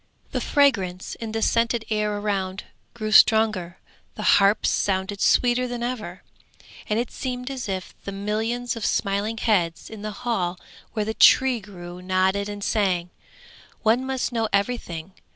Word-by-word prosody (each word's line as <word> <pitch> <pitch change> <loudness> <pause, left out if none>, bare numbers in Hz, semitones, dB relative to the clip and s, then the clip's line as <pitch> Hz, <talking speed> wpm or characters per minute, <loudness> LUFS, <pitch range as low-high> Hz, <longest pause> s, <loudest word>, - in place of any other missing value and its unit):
The - - -2
fragrance 195 - +1
in 225 -1 -6
the 225 0 -2
scented 230 -1 +1
air 210 -1 0
around 195 -2 -2 0.3
grew 215 -2 -4
stronger, 215 -5 +4 0.4
the - - +4
harps 200 +2 +3
sounded 195 0 -1
sweeter 250 0 +3
than 240 -1 -4
ever, 220 -7 -5 0.7
and 210 - +1
it 240 +1 -2
seemed 250 0 -4
as 255 -5 -5
if 185 -1 -4
the 200 - -5
millions 220 +5 -2
of 230 - -6
smiling 205 +3 0
heads 180 -8 0
in 220 -2 -8
the 215 - -4 0.2
hall 180 -7 -1 0.3
where 215 -2 -1
the 220 - -2
Tree 260 +1 +5
grew 180 -3 -10
nodded 190 +2 +1
and 205 -1 -6
sang, 185 -6 0 0.7
'One 230 +3 +3
must 265 -1 -2
know 225 -2 -1
everything. 195 -5 -2
210 Hz, 150 wpm, -24 LUFS, 190-235 Hz, 0.7 s, Tree